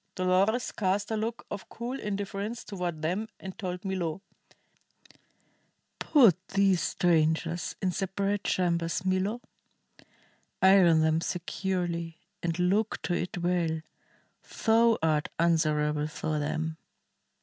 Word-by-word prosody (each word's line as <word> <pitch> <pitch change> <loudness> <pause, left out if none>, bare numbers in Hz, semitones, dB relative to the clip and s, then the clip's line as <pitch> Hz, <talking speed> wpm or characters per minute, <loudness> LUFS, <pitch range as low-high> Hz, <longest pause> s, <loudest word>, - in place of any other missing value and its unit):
Dolores 190 +6 +2
cast 200 +1 -1
a - - +1
look 225 +2 -3
of 205 - -6
cool 245 +3 -5
indifference 205 +2 -4
toward 175 -6 -4
them 185 +7 -1
and 190 -1 -8
told 180 0 -4
Milo: 185 -1 -2 1.8
"Put 195 - +4
these 195 -3 +3
strangers 165 0 +1
in 185 - +2
separate 195 +2 -1
chambers, 170 0 0
Milo. 190 +5 0 1.2
Iron 185 -4 +6
them 160 +1 +2
securely 175 -2 -3 0.2
and 170 -1 -1
look 195 +5 +1
to 175 - -1
it 175 +1 -2
well. 170 -2 0 0.8
Thou 230 0 +5
art 155 -2 +1
answerable 150 -3 +2
for 155 -1 -3
them." 160 +2 -2
180 Hz, 110 wpm, -28 LUFS, 165-200 Hz, 1.8 s, Iron